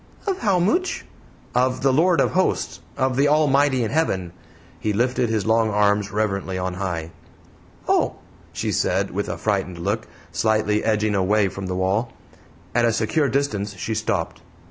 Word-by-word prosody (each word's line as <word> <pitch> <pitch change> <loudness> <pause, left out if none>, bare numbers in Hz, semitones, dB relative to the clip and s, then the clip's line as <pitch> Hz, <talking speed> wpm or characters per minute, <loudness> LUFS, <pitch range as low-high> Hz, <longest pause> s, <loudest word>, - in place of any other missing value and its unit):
"Of 390 -3 -1
how 200 -6 +2
mooch?" 345 - 0 0.5
"Of 130 +1 +1
the 135 -1 +4
Lord 165 +1 +4
of - - +2
Hosts 185 0 0 0.2
of 130 -1 +1
the 140 +3 +3
Almighty 145 -3 +3
in 110 - -2
Heaven." 95 - 0 0.5
He 105 - -1
lifted 120 +2 +1
his 110 -2 0
long 110 0 +3
arms 105 -1 +2
reverently 100 -3 -1
on 90 0 -2
high. 85 -3 -4 0.8
"Oh!" - - +2 0.4
she - - -2
said, 95 +2 0
with 100 +3 -3
a - - -3
frightened 95 -4 -1
look, 100 +6 -2 0.2
slightly 110 +2 +1
edging 110 -1 +1
away 100 +1 +2
from 95 0 -6
the 90 - -3
wall. 95 +6 0 0.6
At 120 - +2
a 115 - +2
secure 135 +7 +1
distance 105 -8 -1
she 95 +5 -3
stopped. 90 -6 -2
110 Hz, 165 wpm, -22 LUFS, 95-130 Hz, 0.8 s, the